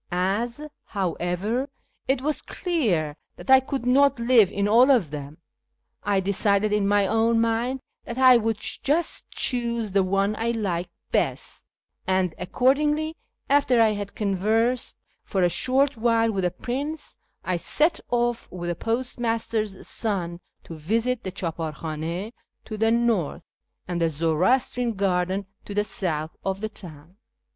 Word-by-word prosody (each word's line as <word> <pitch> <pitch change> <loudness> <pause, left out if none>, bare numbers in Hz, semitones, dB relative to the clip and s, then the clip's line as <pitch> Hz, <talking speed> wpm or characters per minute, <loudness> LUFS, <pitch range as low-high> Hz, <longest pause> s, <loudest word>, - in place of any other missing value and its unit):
As, 200 +8 -1 0.3
however, 195 - -2 0.4
it 265 -1 +1
was 305 +1 0
clear 195 - -1 0.2
that 265 - -4
I 265 - +9
could 265 -1 -4
not 275 +1 +4
live 235 -4 +5
in 200 0 0
all 240 +5 +6
of 225 - +3
them, 145 0 -7 0.6
I 200 -1 +1
decided 200 +2 +2
in 205 -1 +2
my 205 0 +3
own 225 +3 +2
mind 230 +3 0 0.2
that 235 - -6
I 260 -1 +7
would 225 -2 +1
just 300 +9 -1
choose 235 -4 -1
the 195 +1 +3
one 195 +2 +1
I 230 +1 0
liked 195 -7 -2 0.2
best; - - -1 0.4
and 185 -2 +1
accordingly, 295 - +1 0.3
after 280 -4 +3
I 225 -1 +6
had 205 -1 -4
conversed 220 +5 0 0.3
for 190 -2 0
a 175 - +4
short 265 +7 +2
while 230 0 +2
with 190 -3 -1
the - - +3
prince, 275 - -4 0.3
I 180 -1 0
set 310 - +1
off 240 -1 0
with 175 -1 -4
the - - -3
postmaster's 225 -2 -2
son 180 -6 -2 0.2
to - - -9
visit 225 +10 -1
the 190 - -4
clKqjAr 165 -4 -4
khdnd 165 +7 -4 0.3
to 215 - -6
the 225 +1 +2
north, 225 -9 +1 0.4
and 175 -1 -2
the 165 - +3
Zoroastrian 185 - +1
garden 190 0 0 0.2
to 205 - -7
the 205 - +2
south, 160 -6 -3
of 195 0 -2
the 215 +1 -3
town. 170 -3 -12
215 Hz, 150 wpm, -25 LUFS, 185-245 Hz, 0.6 s, I